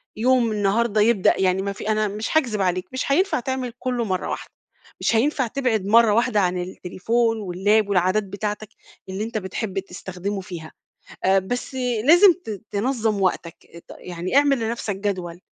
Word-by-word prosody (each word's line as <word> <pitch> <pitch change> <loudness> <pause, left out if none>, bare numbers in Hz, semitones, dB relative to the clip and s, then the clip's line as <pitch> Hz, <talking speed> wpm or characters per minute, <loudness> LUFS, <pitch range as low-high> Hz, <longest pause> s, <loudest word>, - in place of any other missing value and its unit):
يوم 240 0 +2
النهارده 210 +1 +1
يبدأ 210 -3 +4
يعني 185 0 +2
ما 200 0 -3
في 205 - -6
أنا 215 0 +1
مش 215 +9 -2
هاكذب 230 -9 0
عليك، 180 -1 0
مش 260 +1 -2
هينفع 375 +4 +2
تعمل 255 -1 -3
كُلّه 250 -2 -1
مَرّة 185 -3 -2
واحدة، - - -5 0.5
مش - - +1
هينفع 260 +1 +1
تبعد 225 -6 -1
مَرّة 225 +1 +5
واحدة 235 -1 +2
عن 180 -2 +1
التليفون 225 +6 -1
واللاب 205 +2 +1
والعادات 185 +2 +2
بتاعتَك، 210 +2 -5 0.4
اللي 195 +3 -3
أنت 225 -1 -4
بتحب 195 0 -3
تستخدمه 190 +1 -5
فيها، 170 -4 -9 0.5
آآ 190 +1 +4
بس 245 +7 -4 0.3
لازم 350 +5 +8
ت 210 -3 -6
تنظَّم 220 -2 0
وقتَك، 170 -1 -3
ط - - -10
يعني 180 +7 -4
اعمل 280 -3 +4
لنفسَك 225 -3 -3
جدول، 185 -4 -4
210 Hz, 160 wpm, -23 LUFS, 190-235 Hz, 0.5 s, لازم